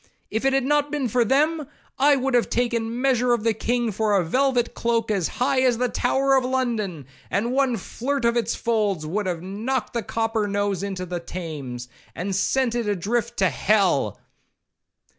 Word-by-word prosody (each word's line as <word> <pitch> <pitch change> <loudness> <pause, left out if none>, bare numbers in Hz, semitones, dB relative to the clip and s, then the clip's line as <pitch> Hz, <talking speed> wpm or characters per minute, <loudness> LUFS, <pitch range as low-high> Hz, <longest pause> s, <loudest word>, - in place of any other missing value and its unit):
'If 220 +4 -1
it 270 - +3
had 270 -1 +2
not 295 +2 +2
been 285 -3 -1
for 240 +2 +2
them, 300 +5 +1 0.3
I 285 +1 +5
would 270 0 -1
have 240 -1 +3
taken 235 0 -1
measure 250 -2 +3
of 235 -3 0
the 225 -1 +2
king 240 +1 -1
for 210 +1 +1
a 180 - +1
velvet 255 +5 +1
cloak 230 -1 0
as 195 -5 +1
high 260 +1 +2
as 250 -3 +3
the 250 +1 0
Tower 270 +3 +2
of 260 - +3
London, 230 - -1 0.2
and 225 +5 0
one 260 -2 +2
flirt 260 +6 -3
of 235 0 +3
its 230 -1 0
folds 210 -8 0
would 190 +5 -2
have 175 -2 -3
knocked 220 +7 -3
the 235 - -1
'copper 225 0 -1
nose' 200 -2 -1
into 195 -2 -4
the 175 0 -4
Thames, 150 -9 -6 0.3
and 190 +3 -3
sent 255 +5 +1
it 240 -2 -1
a 205 - +1
drift 235 +6 -2
to 190 -2 +3
Hell.' 180 - +2
230 Hz, 190 wpm, -24 LUFS, 200-255 Hz, 0.3 s, I